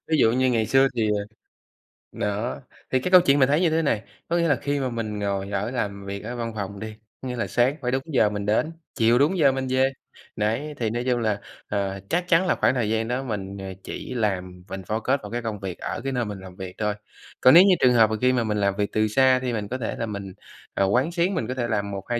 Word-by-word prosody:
Ví 160 - +2
dụ 115 - +5
như 130 +1 +2
ngày 115 -3 +1
xưa 135 0 +4
thì, 110 -2 +1
ờ 100 - -3 0.9
đó, 105 +6 -3 0.3
thì 130 - +3
cái 180 - -3
câu 180 -1 +9
chuyện 145 -5 +3
mình 130 - +5
thấy 150 +5 +3
như 170 - +4
thế 160 +1 +1
này, 115 -8 0 0.2
có 170 - +1
nghĩa 170 -1 +2
là 145 - +4
khi 140 +1 -2
mà 130 - -1
mình 110 -3 -4
ngồi 100 -1 -2
ở 105 +4 -2
làm 100 -5 -3
việc 100 +1 -5
ở 120 +3 -5
văn 115 -1 -4
phòng 100 -1 -5
đi, 110 0 -7 0.3
có 130 - -5
nghĩa 125 - -3
là 120 - -2
sáng 125 +4 +2
phải 125 0 -1
đúng 135 0 -1
giờ 125 -9 +2
mình 105 -1 -4
đến, 110 +10 +1 0.2
chiều 115 +1 +4
đúng 160 +7 +3
giờ 140 -4 +5
mình 130 0 -3
về. 130 +1 +3 0.5
Đấy, 115 +9 -1
thì 115 -2 -1
nói 120 +2 -2
chung 125 -1 +1
là, 110 -3 0 0.3
ờ, 100 -1 -2
chắc 175 +1 0
chắn 180 +1 +4
là - - +3
khoảng - - +2
thời 115 -4 0
gian 110 0 0
đó 125 +2 -2
mình, 100 -5 -5
ờ, 95 -1 -6
chỉ - - -6
làm 90 -6 -2
mình 95 0 -5
focus 110 +8 0
vào 105 - -7
cái 120 0 -2
công 110 -3 -4
việc 95 -3 -5
ở - - -4
cái 135 - -2
nơi 125 -2 0
mình 105 -2 -6
làm 95 -1 -11
việc 95 -2 -8
thôi. 105 -1 0 0.5
Còn 130 - +7
nếu 175 - +10
như 195 -2 +5
trường 125 -1 +5
hợp 110 -2 +5
mà 110 - -1
khi 130 0 +4
mà 120 -2 +1
mình 105 -1 -1
làm 100 -1 +1
việc 100 0 -1
từ 110 0 +2
xa 130 +3 +4
thì 125 -2 -2
mình 105 -2 -3
có 130 - -3
thể 120 -4 -3
là 115 - -1
mình, 100 -3 -6 0.4
ờ, 100 - +2
quán 125 - +2
xuyến, 175 +3 +1
mình 115 - -2
có 130 - -2
thể 120 -2 -2
làm 100 -3 -1
1-2 100 +5 -3
115 Hz, 275 wpm, -24 LUFS, 105-130 Hz, 0.9 s, nếu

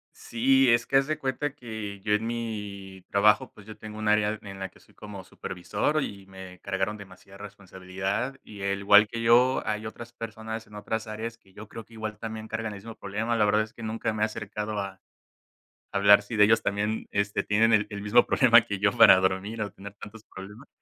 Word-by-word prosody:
Sí, 130 +2 +2
es 115 0 +3
que 135 - +2
haz 135 +1 +2
de 155 -1 -1
cuenta 135 +1 -3
que 110 -4 -7
yo 105 +1 0
en 110 +2 0
mi 105 -5 -6
trabajo, 105 +1 +3
pues 100 - -15
yo 110 -1 -11
tengo 110 0 -9
un 110 -1 -1
área 105 0 +2
en 95 -1 -10
la 95 - -3
que - - -22
soy - - -24
como 100 -2 -10
supervisor 100 - -2
y 100 -1 -7
me 95 -1 -11
cargaron 100 +2 -2
demasiada 95 0 -14
responsabilidad 100 +4 -5
y 100 -2 -11
al 100 0 -1
igual 105 +1 +6
que 115 +2 -5
yo, 120 +3 +4
hay 110 +1 -3
otras 120 +2 -8
personas 110 -1 -7
en 105 - -15
otras 110 +2 -4
áreas, 115 +2 -6
que 95 -1 -26
yo 105 +1 -11
creo 115 -1 -9
que 115 - -21
igual 110 -1 -6
también 110 -1 -7
cargan 110 -1 -4
el - - -8
mismo 115 +2 -10
problema. 110 +4 -2
La 105 - +3
verdad 105 +1 +3
es 110 - -12
que 115 - -11
nunca 110 +1 -2
me 105 0 -1
he - - +5
acercado 105 -1 -5
a 95 -1 -6 1.0
a - - +3
hablar 100 0 +6
si 110 +2 -6
de 105 -1 +6
ellos 110 +2 +3
también, 105 +2 -1
este, 100 0 -1
tienen 110 +2 +3
el 105 -2 +4
el 100 0 -5
mismo 110 +4 +4
problema 120 -2 +6
que 105 -4 -5
yo 100 -1 +3
para - - +9
dormir 95 +4 -1
o 105 - -2
tener 100 +1 -11
tantos 105 +1 -12
problemas. 105 +8 -12
105 Hz, 220 wpm, -27 LUFS, 100-115 Hz, 1.0 s, para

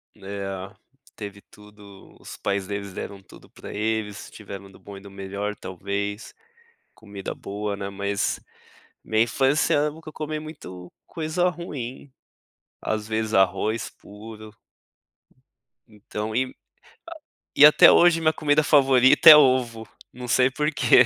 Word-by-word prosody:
Né, 95 -2 -14 0.9
teve 100 -1 -9
tudo. 105 -2 -17
Os - - -10
pais 100 -1 -2
deles 100 -1 -5
deram 100 +1 -7
tudo - - -17
pra - - -11
eles, 110 -1 -3
tiveram 100 -2 -10
do - - -17
bom 100 -1 -11
e 95 - -12
do 100 - -12
melhor 100 +1 -5
talvez, 100 +3 -5 0.6
comida 100 -3 -8
boa, 105 +1 -5
né. 100 0 -5
Mas 100 0 -2 0.7
minha 110 0 +2
infância 135 +5 +1
eu 150 +1 +1
nunca 160 0 -11
comi 155 0 -4
muito 90 - -10 0.2
coisa 165 +3 -1
ruim. 140 -7 -7 0.7
Às 110 -1 -3
vezes 110 0 -2
arroz 105 +4 +1
puro. 110 +1 -13 1.4
Então, 105 0 -7
e 130 +2 +2
a - - -12 1.0
e 145 - +9
até 150 - +8
hoje 175 -1 +5
minha 155 -1 +2
comida 150 -1 +2
favorita 135 -3 +6
é 155 - +13
ovo. 125 -5 +2 0.2
Não 125 0 -9
sei 130 +1 +3
porquê. 150 -3 +4
110 Hz, 135 wpm, -24 LUFS, 100-135 Hz, 1.4 s, é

